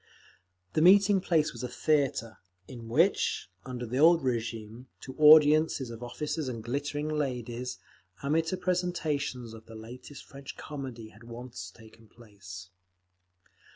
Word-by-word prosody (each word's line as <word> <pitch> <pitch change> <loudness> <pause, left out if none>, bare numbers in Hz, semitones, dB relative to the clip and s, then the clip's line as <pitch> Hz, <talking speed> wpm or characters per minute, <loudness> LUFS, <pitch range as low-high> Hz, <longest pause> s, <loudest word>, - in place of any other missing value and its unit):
The 155 - +2
meeting 195 +2 +6
place 160 -4 +1
was 120 - -8
a 125 - -3
theatre, 135 -4 0 0.3
in 120 -3 -9
which, 155 - +2 0.2
under 125 -1 -5
the 125 +3 -2
old 165 0 +6
régime, 115 -1 -3 0.2
to 130 - -9
audiences 150 -3 +6
of 115 0 -9
officers 150 +4 -3
and 115 -3 -5
glittering 145 +4 -3
ladies, 125 -5 -3 0.5
amateur 160 +5 +1
presentations 160 -9 -2
of 110 0 -13
the 115 - -11
latest 125 +5 -10
French 140 0 -10
comedy 130 -7 -7
had 110 +2 -18
once 115 -6 -8
taken 110 +3 -17
place. 100 -6 -12
130 Hz, 130 wpm, -29 LUFS, 115-155 Hz, 0.5 s, meeting